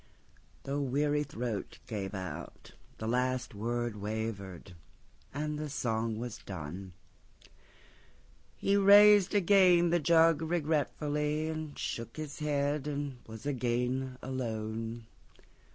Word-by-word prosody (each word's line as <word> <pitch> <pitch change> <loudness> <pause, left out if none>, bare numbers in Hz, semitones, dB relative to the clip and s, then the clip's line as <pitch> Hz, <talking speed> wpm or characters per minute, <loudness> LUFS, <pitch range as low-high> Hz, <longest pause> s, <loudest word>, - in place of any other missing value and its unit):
The 140 +1 -2
weary 145 +2 +1
throat 120 -7 -4
gave 100 -3 -4
out, 85 -3 -7 0.3
The 110 - -4
last 125 +1 0
word 120 +1 -2
wavered; 100 -4 -5 0.6
and 150 +1 -3
the 155 -1 -4
song 115 -4 -1
being 120 -1 -4
done, 90 +1 -6 1.6
He 200 - +2
raised 205 0 +7
again 180 -3 +5
the 175 - +3
jug 165 0 +5
regretfullyAnd 155 -1 -1
shook 115 +2 -4
his 155 -1 -6
head, 145 -1 0
and 140 -3 -3
was 110 +3 -10
again 125 0 -1
alone. 115 -2 -4
130 Hz, 105 wpm, -31 LUFS, 110-150 Hz, 1.6 s, raised